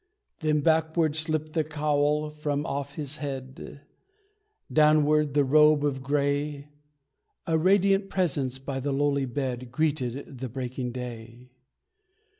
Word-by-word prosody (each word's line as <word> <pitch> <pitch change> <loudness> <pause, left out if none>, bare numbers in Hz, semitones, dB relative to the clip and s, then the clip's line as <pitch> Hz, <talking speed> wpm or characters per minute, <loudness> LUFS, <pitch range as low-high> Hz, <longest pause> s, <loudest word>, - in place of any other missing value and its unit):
Then 150 -1 +1
backward 160 0 +2
slipped 155 -1 -1
the 160 - +1
cowl 150 0 0
from 150 -1 -2
off 140 -1 -4
his 150 -1 -4
head, 135 -1 -7 0.9
Downward 150 -1 +4
the 145 - +5
robe 150 +1 +5
of 135 -2 -1
grey; 145 +1 -1 0.8
A 165 - +1
radiant 195 +3 +3
presence 140 -8 -1
by 135 0 -5
the 140 +2 -2
lowly 140 0 +1
bed 125 -1 -4
Greeted 140 -2 -2
the 130 0 -4
breaking 125 0 -4
day. 120 0 -8
145 Hz, 120 wpm, -27 LUFS, 135-155 Hz, 0.9 s, the